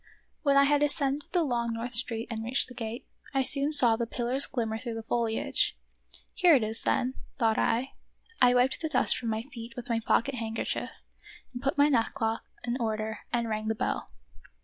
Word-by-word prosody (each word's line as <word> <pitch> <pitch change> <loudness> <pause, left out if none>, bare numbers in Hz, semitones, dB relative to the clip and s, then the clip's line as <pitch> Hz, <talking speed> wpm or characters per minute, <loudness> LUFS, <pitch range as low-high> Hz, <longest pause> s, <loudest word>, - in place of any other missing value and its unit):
When 280 -2 +3
I 280 - +7
had 290 +1 +3
ascended 285 -1 -1
the 350 -2 +2
long 235 -4 -1
North 235 +2 -5
Street 230 -1 0
and 220 -1 -4
reached 250 +4 +1
the 250 - -11
gate, 230 0 -6 0.3
I 270 - +3
soon 280 +3 +7
saw 245 -7 +7
the 235 0 -3
pillars 245 +4 -1
glimmer 225 -4 -3
through 235 -2 -5
the 225 - -6
foliage. 225 -1 -1 0.3
" - - -21
Here 355 -5 +5
it 250 - +2
is 220 +1 -4
then," 255 +1 0 0.2
thought 225 -3 +1
I. 245 +4 0 0.5
I 250 0 +6
wiped 250 +2 +2
the 315 - -2
dust - - +2
from 235 - -4
my 220 0 -2
feet 235 -3 -10
with 245 0 -8
my 230 -1 +1
pocket 230 +4 +1
handkerchief, 225 -2 -3 0.7
put 275 +1 -1
my 285 +1 +5
neckcloth 225 -4 0 0.2
in 245 +1 -2
order, 220 -1 -3
and 235 -1 0
rang 215 -1 -3
the 220 - 0
bell. 250 - -3
240 Hz, 195 wpm, -28 LUFS, 225-270 Hz, 0.7 s, I